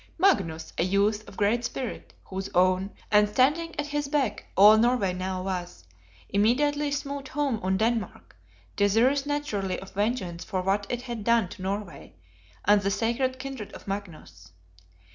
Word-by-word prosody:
Magnus, 190 Hz, -, +1 dB
a -, -, +3 dB
youth 205 Hz, +3 st, +1 dB
of 195 Hz, -, -14 dB
great 215 Hz, +4 st, +2 dB
spirit, 245 Hz, 0 st, -5 dB
whose 190 Hz, +1 st, -5 dB
own, 185 Hz, +2 st, +3 dB, 0.2 s
and 210 Hz, 0 st, +5 dB
standing 300 Hz, +8 st, +1 dB
at 295 Hz, -, 0 dB
his 295 Hz, -1 st, -2 dB
beck, 275 Hz, -6 st, -1 dB
all 210 Hz, +3 st, +9 dB
Norway 225 Hz, -4 st, +2 dB
now 185 Hz, 0 st, -3 dB
was, 180 Hz, -, -5 dB, 0.4 s
immediately 290 Hz, +8 st, +2 dB
smote 280 Hz, -1 st, -4 dB
home 280 Hz, -6 st, -1 dB
on 190 Hz, +1 st, +1 dB
Denmark; 225 Hz, +1 st, -2 dB, 0.4 s
desirous 240 Hz, +8 st, +3 dB
naturally 220 Hz, -11 st, -2 dB
of 190 Hz, -, -11 dB
vengeance 200 Hz, -5 st, -2 dB
for 185 Hz, -3 st, -3 dB
what 195 Hz, +2 st, 0 dB
it 245 Hz, 0 st, -3 dB
had 240 Hz, -4 st, -5 dB
done 230 Hz, -4 st, +3 dB
to -, -, -10 dB
Norway, 195 Hz, -5 st, -5 dB, 0.5 s
and 205 Hz, +1 st, +5 dB
the 195 Hz, -, 0 dB
sacred 235 Hz, +5 st, 0 dB
kindred 260 Hz, -5 st, -7 dB
of -, -, -12 dB
Magnus. 155 Hz, -, -7 dB
210 Hz, 155 wpm, -27 LUFS, 190-260 Hz, 0.5 s, all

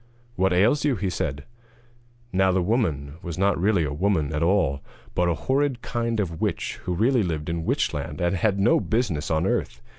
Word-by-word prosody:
'What 95 Hz, 0 st, +2 dB
ails 105 Hz, +11 st, +3 dB
you?' 145 Hz, -3 st, +2 dB
he 95 Hz, -2 st, -2 dB
said. 70 Hz, -4 st, -3 dB, 0.9 s
Now 95 Hz, 0 st, +3 dB
the 95 Hz, -, +2 dB
woman 80 Hz, -, -1 dB
was 85 Hz, -3 st, -6 dB
not 95 Hz, -2 st, +1 dB
really 100 Hz, -3 st, +3 dB
a 70 Hz, -2 st, -2 dB
woman 80 Hz, -3 st, 0 dB
at 75 Hz, -, -1 dB
all, 85 Hz, -6 st, +2 dB, 0.3 s
but 90 Hz, 0 st, +1 dB
a 85 Hz, -, +1 dB
horrid 135 Hz, -, 0 dB
kind 115 Hz, -2 st, -2 dB
of 85 Hz, -5 st, -3 dB
witch -, -, -2 dB
who 90 Hz, -, -1 dB
really 120 Hz, +6 st, +3 dB
lived 80 Hz, -5 st, -2 dB
in 85 Hz, 0 st, -2 dB
Witchland, 75 Hz, -, -1 dB
and 85 Hz, +1 st, +1 dB
had 100 Hz, +2 st, +1 dB
no 100 Hz, +5 st, +4 dB
business 105 Hz, -10 st, -1 dB
on 80 Hz, +2 st, +1 dB
earth. -, -, -1 dB
95 Hz, 190 wpm, -24 LUFS, 80-110 Hz, 0.9 s, no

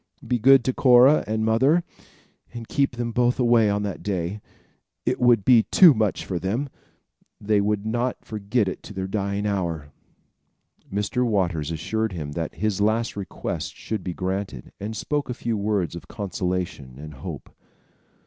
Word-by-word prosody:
Be 125 Hz, -, 0 dB
good 135 Hz, +2 st, +6 dB
to 130 Hz, -, 0 dB
Cora 130 Hz, +4 st, +6 dB
and 110 Hz, 0 st, -1 dB
mother, 135 Hz, +10 st, +3 dB, 0.7 s
and 120 Hz, -2 st, -8 dB
keep 140 Hz, -3 st, 0 dB
them 120 Hz, 0 st, -3 dB
both 120 Hz, +1 st, +2 dB
away 120 Hz, -3 st, +4 dB
on 100 Hz, 0 st, 0 dB
that 100 Hz, -3 st, -4 dB
day. 95 Hz, 0 st, -3 dB, 0.6 s
It -, -, 0 dB
would 120 Hz, -5 st, +4 dB
be 125 Hz, -3 st, +7 dB
too 175 Hz, -5 st, +8 dB
much 110 Hz, -4 st, -1 dB
for 90 Hz, -3 st, -3 dB
them. 115 Hz, +11 st, -2 dB, 0.7 s
They 105 Hz, 0 st, +2 dB
would 105 Hz, 0 st, -1 dB
not 120 Hz, +3 st, -2 dB
forget 105 Hz, +1 st, -1 dB
it 95 Hz, -, -4 dB
to 105 Hz, -, -11 dB
their 95 Hz, 0 st, -3 dB
dying 100 Hz, +1 st, -2 dB
hour." 85 Hz, -8 st, -2 dB, 1.0 s
Mr. 105 Hz, +5 st, -1 dB
Waters 90 Hz, -10 st, 0 dB
assured 100 Hz, +7 st, -2 dB
him 75 Hz, -4 st, -5 dB
that 80 Hz, +1 st, -4 dB
his 105 Hz, -2 st, -1 dB
last 110 Hz, +2 st, +1 dB
requests 100 Hz, -5 st, -4 dB
should 110 Hz, -4 st, -5 dB
be 90 Hz, -2 st, -4 dB
granted, 95 Hz, -8 st, -4 dB
and 110 Hz, +2 st, -5 dB
spoke 145 Hz, +5 st, -2 dB
a 125 Hz, -, -3 dB
few 115 Hz, -1 st, -2 dB
words 100 Hz, -4 st, -1 dB
of 85 Hz, -, -9 dB
consolation 90 Hz, -, -4 dB
and 75 Hz, +1 st, -9 dB
hope. 65 Hz, -, -8 dB
105 Hz, 165 wpm, -24 LUFS, 95-120 Hz, 1.0 s, too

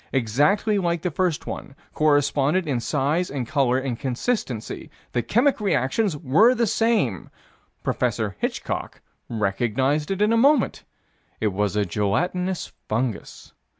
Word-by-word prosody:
Exactly 145 Hz, -, +2 dB
like 170 Hz, -3 st, -1 dB
the 180 Hz, -, -1 dB
first 175 Hz, -1 st, -1 dB
one. 135 Hz, -, -7 dB, 0.2 s
Corresponded 145 Hz, +3 st, +2 dB
in 135 Hz, -5 st, -1 dB
size 150 Hz, +7 st, 0 dB
and 135 Hz, -4 st, -4 dB
color 130 Hz, -2 st, +2 dB
and 130 Hz, -3 st, -3 dB
consistency. 130 Hz, -, -3 dB, 0.2 s
The 120 Hz, -, 0 dB
chemic 240 Hz, -, +2 dB
reactions 175 Hz, -, +1 dB
were 170 Hz, -, +4 dB
the 235 Hz, -, +2 dB
same. 215 Hz, -, +1 dB, 0.5 s
Prof. 110 Hz, -4 st, -1 dB
Hitchcock -, -, -3 dB, 0.3 s
recognized 120 Hz, +7 st, 0 dB
it 195 Hz, 0 st, -2 dB
in 210 Hz, +2 st, +3 dB
a -, -, +3 dB
moment. 275 Hz, +1 st, +3 dB, 0.5 s
It 105 Hz, -3 st, 0 dB
was 105 Hz, 0 st, 0 dB
a 105 Hz, -1 st, +2 dB
gelatinous 175 Hz, -, -1 dB, 0.2 s
fungus. 115 Hz, 0 st, -3 dB
145 Hz, 130 wpm, -24 LUFS, 120-185 Hz, 0.5 s, were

